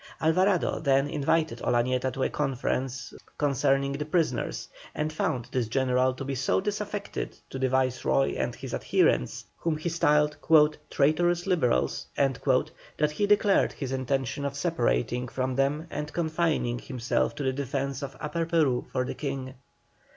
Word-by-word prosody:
Alvarado 185 +3 +2
then 135 -2 +2
invited 145 -3 0
Olañeta 125 +2 +1
to 135 - -2
a - - +1
conference 130 -2 -2 0.2
concerning 140 -1 +2
the 140 +2 -2
prisoners, 165 +1 -1 0.3
and 155 +1 -2
found 125 -6 -1
this 125 -3 0
general 130 +1 +2
to 135 - -6
be 140 - -2
so 130 0 +1
disaffected 205 0 -4
to 135 - -5
the 130 0 +1
Viceroy 130 +1 +1
and - - -2
his - - -7
adherents, 60 - +1
whom 165 -2 -1
he 155 +3 -2
styled 150 -2 +3 0.5
"traitorous 175 +4 +2
Liberals," 150 - +1
that 135 +2 0
he 205 +6 0
declared 205 -1 +3
his 135 -3 -5
intention 135 +1 -1
of 140 -1 -2
separating 125 - 0
from 130 +1 -2
them 140 +4 +1
and 150 0 -4
confining 160 -7 0
himself 115 - -1
to - - -4
the 130 -1 +1
defence 135 0 -3
of 135 -1 -6
Upper 160 +2 -2
Peru 155 -7 +2
for 130 -1 0
the - - -4
King. 135 -2 -4
140 Hz, 150 wpm, -27 LUFS, 130-155 Hz, 0.5 s, styled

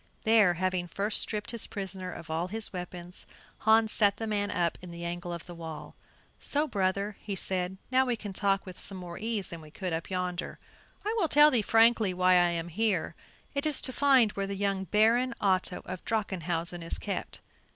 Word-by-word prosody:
There, 215 -5 +5
having 185 0 -1
first 205 +4 0
stripped 210 -1 -3
his 235 -2 -4
prisoner 190 -2 -5
of 165 -2 -8
all 165 +3 -1
his 220 +2 +2
weapons, 180 0 -7 0.3
Hans 220 0 +4
sat 205 -2 +3
the 225 - -3
man 205 -2 0
up 175 -3 0
in 180 - -9
the 170 0 -7
angle 175 +1 -4
of 170 -1 -6
the 175 - -9
wall. 165 -2 -8 0.5
"So, 295 +2 +1
brother;" 200 -1 -1 0.2
said 185 -1 -1
he, 255 - -10
"now 260 0 +5
we 245 - +1
can 205 -3 -7
talk 195 0 +1
with 185 +1 -6
more 180 -2 -7
ease 215 -2 -2
than 170 -1 -7
we 155 - -13
could 180 +2 -4
up 165 0 -3
yonder. 180 -1 -3 0.5
I 430 - 0
will 345 - +3
tell 295 0 +6
thee 240 - +3
frankly 225 -3 +4
why 185 0 +3
I 175 -1 +5
am 170 0 -3
here; 200 -1 0 0.4
it 280 +1 -1
is 300 - +1
to 260 - 0
find 265 -6 +5
where 195 -1 -3
the 200 - -3
young 195 -1 -1
Baron 235 +5 +3
Otto 185 -2 0
of 185 -1 -6
Drachenhausen 175 -5 -2
is 165 - 0
kept. - - -5
195 Hz, 200 wpm, -29 LUFS, 175-220 Hz, 0.5 s, tell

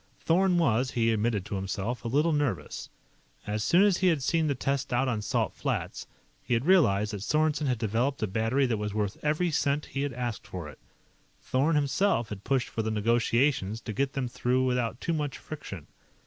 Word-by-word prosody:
Thorn 180 +2 +3
was, 130 -6 +2
he 115 -2 +1
admitted 105 -3 0
to 105 - -6
himself, 95 +5 -3
a - - -3
little 150 +7 +2
nervous. 145 - -2 0.6
As 105 0 -2
soon 175 - +5
as 200 -3 +4
he 185 - +2
had 160 -6 +2
seen 165 +2 +1
the 140 - 0
test 135 +1 -2
out 125 +2 +2
on 115 -4 -1
Salt - - -1
Flats, - - -3 0.3
he 120 - 0
had 115 +4 -1
realized 105 - +4
that 100 - -4
Sorensen 155 +4 +1
had 125 -2 +1
developed 115 +5 -1
a - - +4
battery 115 +7 +1
that 120 -3 0
was 105 0 -4
worth 105 -2 -2
every 155 +3 +1
cent 145 0 0
he 135 - -1
had 140 -2 -2
asked 120 -3 -4
for 90 -4 -6
it. 75 - -12 0.6
Thorn 145 +5 +1
himself 145 - +1
had 100 -1 -7
pushed 130 0 0
for 115 - -2
the 110 - -2
negotiations 115 0 +1
to 110 - -5
get 135 +6 -1
them 135 -2 -2
through 125 +2 0
without 125 -2 -1
too 170 - -1
much 150 -3 -2
friction. 100 - -8
125 Hz, 205 wpm, -28 LUFS, 110-145 Hz, 0.6 s, soon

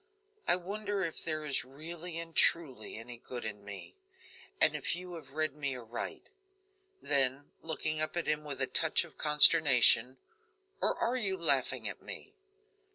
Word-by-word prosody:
I - - +3
wonder 200 +2 -4
if 165 -3 -5
there 155 -2 -2
is 145 -2 0
really 160 +6 -5
and 165 0 -6
truly 135 -12 +2
any 120 +2 -10
good 120 0 -8
in 105 -2 -6
me, 100 - -11 0.6
and - - +4
if - - -1
you 180 0 -8
have 145 -5 -11
read 155 -1 -1
me 140 -2 -2
aright." 120 -1 -7 0.7
Then 135 0 +2
looking 155 -1 -2
up 155 +2 -3
at 170 - -1
him 150 0 -1
with 145 -3 -7
a - - +2
touch 160 +6 +2
of 170 - -16
consternation: 140 -5 +6 0.6
"Or - - +1
are 245 +2 -1
you 195 -5 -2
laughing 170 -2 +1
at - - -8
me?" 405 - -9
155 Hz, 160 wpm, -31 LUFS, 130-170 Hz, 0.7 s, consternation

